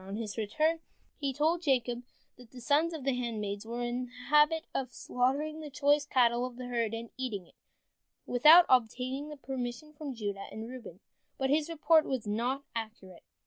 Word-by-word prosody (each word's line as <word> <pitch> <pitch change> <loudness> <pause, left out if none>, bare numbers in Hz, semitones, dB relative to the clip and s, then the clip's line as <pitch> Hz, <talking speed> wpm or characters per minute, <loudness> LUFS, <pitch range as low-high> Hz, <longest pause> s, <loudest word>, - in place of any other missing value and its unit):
On 195 +1 -6
his 215 -2 -4
return 310 +10 0 0.4
he 280 -2 -1
told 315 +5 +1
Jacob 245 -6 +1 0.3
that 245 -2 -16
the 255 - -12
sons 300 +6 +2
of 315 -5 -6
the 270 0 +1
handmaids 215 -4 -3
were 240 +1 -3
in 240 +1 -2
the - - -20 0.2
habit 300 +2 +5
of 255 -2 -2
slaughtering 280 +7 -1
the 305 -1 -7
choice 290 +1 +2
cattle 240 -2 +3
of 250 -1 -4
the 250 0 -7
herd 230 -2 -1
and 230 0 -7
eating 225 -8 -4
it, - - -23 0.7
without 310 +8 +8
obtaining 260 +4 0
permission 265 +3 -5
from 290 -3 -6
Judah 200 -3 -4
and 220 +1 -6
Reuben. 235 -7 -10 0.4
But 265 0 0
his 305 +2 +2
report 325 0 +4
was 260 -5 -2
not 240 +6 -1
accurate. 215 -6 -7
255 Hz, 180 wpm, -31 LUFS, 230-295 Hz, 0.7 s, without